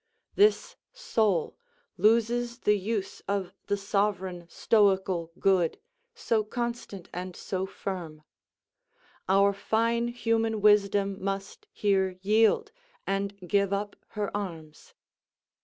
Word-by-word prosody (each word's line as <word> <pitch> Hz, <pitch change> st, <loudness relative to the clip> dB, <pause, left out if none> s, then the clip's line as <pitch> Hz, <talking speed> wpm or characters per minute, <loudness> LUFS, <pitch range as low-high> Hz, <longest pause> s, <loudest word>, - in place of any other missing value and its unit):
This 430 Hz, +4 st, +3 dB
soul 220 Hz, -, 0 dB, 0.4 s
loses 235 Hz, +4 st, +2 dB
the 210 Hz, -, +4 dB
use 200 Hz, 0 st, -3 dB
of 195 Hz, -2 st, -2 dB
the 205 Hz, -, +1 dB
sovereign 195 Hz, -3 st, -1 dB
stoical 190 Hz, -5 st, +2 dB
good, 185 Hz, -4 st, +2 dB, 0.4 s
so 230 Hz, -, 0 dB
constant 235 Hz, -4 st, -5 dB
and 180 Hz, 0 st, -5 dB
so 190 Hz, 0 st, -3 dB
firm. 175 Hz, -6 st, -6 dB, 1.1 s
Our 200 Hz, +1 st, +4 dB
fine 230 Hz, +3 st, 0 dB
human 225 Hz, -2 st, 0 dB
wisdom 200 Hz, -2 st, +3 dB
must 195 Hz, 0 st, -4 dB
here 190 Hz, -3 st, +1 dB
yield, 225 Hz, -, +3 dB, 0.3 s
and 195 Hz, +1 st, -2 dB
give 200 Hz, +1 st, +2 dB
up 205 Hz, +1 st, -2 dB, 0.2 s
her 205 Hz, -1 st, -2 dB
arms. 165 Hz, -7 st, -7 dB
200 Hz, 105 wpm, -28 LUFS, 190-225 Hz, 1.1 s, the